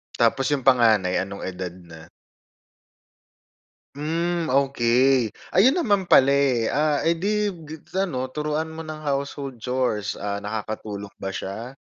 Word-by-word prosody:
Tapos 130 +3 +2
'yong 145 -2 0
panganay, 110 -8 +4
anong 100 +1 -5
edad 90 -1 -5
na? 85 -3 -13 1.9
Hmm, 165 +2 -1
okay. 130 -3 +3 0.2
Ayun 255 - +5
naman 205 - +2
pala, 135 -6 +6
eh. 140 -4 +2
Ah, 150 0 +1
eh, 170 - +3
'di 210 +4 0 0.2
gibs 155 +3 -11
ano 160 -10 -1
turuan 150 +3 -2
mo 160 0 -8
ng 155 -1 -7
household 140 -2 -3
chores. 125 -5 -1
Ah, 100 0 -3
nakakatulong 105 -1 -5
ba 95 - -5
siya? 110 +8 -6
135 Hz, 130 wpm, -24 LUFS, 110-155 Hz, 1.9 s, pala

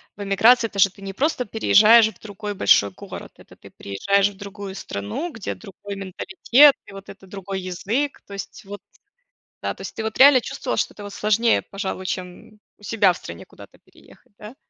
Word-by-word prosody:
в 205 - -7
эмиграции 225 +4 +4
то, 200 - -8
что 195 - +6
ты 195 +1 -17
не 195 - -6
просто 265 - -1
переезжаешь 220 +1 +5
в 220 - -10
другой 205 0 -7
большой 100 - +4
город. 95 - -11
Это - - -17
ты - - -16
приезжаешь 200 - 0
в 195 - -15
другую 200 -1 -8
страну, 105 - -5
где 225 -4 -5
другой 200 0 -10
менталитет, 195 +9 +3
и, - - -12
вот, 195 0 -11
это 195 -1 -13
другой 195 0 -6
язык, 210 +10 -3
то 200 - -12
есть, 200 +3 -8
вот 200 0 -9 0.8
Да, - - -2
то - - -12
есть - - -8
ты, 220 - -5
вот, 220 0 -4
реально 270 -1 +8
чувствовала, - - -4
что - - -1
это, 205 - -11
вот, 205 0 -8
сложнее, 225 +2 +2
пожалуй, 195 -1 -6
чем, 185 +3 -7 0.2
у - - -25
себя 205 -4 +2
в - - -10
стране 85 0 -10
куда-то - - -17
переехать, - - -22
да? 215 +4 -11
200 Hz, 200 wpm, -22 LUFS, 195-220 Hz, 0.8 s, реально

